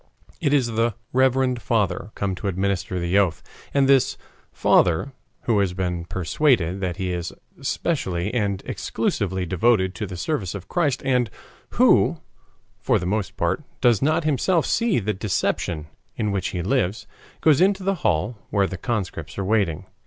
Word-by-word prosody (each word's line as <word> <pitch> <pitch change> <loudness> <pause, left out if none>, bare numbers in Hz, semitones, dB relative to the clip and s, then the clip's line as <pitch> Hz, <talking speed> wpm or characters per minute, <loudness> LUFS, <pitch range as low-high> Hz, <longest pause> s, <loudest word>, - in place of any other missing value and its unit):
It 145 -5 +1
is 140 -4 +3
the 115 -1 0 0.2
"reverend 130 -1 +2
father" 105 -2 0
come 100 -1 -1
to 95 +3 -5
administer 95 0 -1
the 85 +3 +2
oath. 90 -6 0 0.3
And 140 -1 +3
this 135 -2 +3 0.3
"father," 90 +11 +2 0.3
who 115 -4 +1
has 95 -3 +1
been 90 -2 -2
persuaded 95 - +1
that 90 -2 -2
he 95 -2 -2
is 85 -1 -3 0.3
specially 90 +3 -1
and 100 -5 -1
exclusively 95 -1 -2
devoted 95 +1 +2
to 105 +1 -4
the 90 - -7
service 100 - -2
of 95 -2 -7
Christ, 150 - 0
and 125 -4 +2 0.5
who, - - +5 0.6
for - - +2
the 90 - -4
most 105 +1 -2
part, 85 - 0 0.2
does 120 -5 +3
not 155 +4 +2
himself 155 +3 +2
see 230 -3 +1
the 105 -2 0
deception 90 -5 -1 0.3
in 105 -2 -1
which 95 -1 -1
he 90 -2 -3
lives, 110 -1 0 0.3
goes 155 0 +4
into 195 0 +3
the 195 +1 +1
hall 105 +3 0
where 100 -1 +2
the 95 - -5
conscripts 90 -10 -3
are 100 - -2
waiting. 100 -7 +1
100 Hz, 160 wpm, -23 LUFS, 90-125 Hz, 0.6 s, who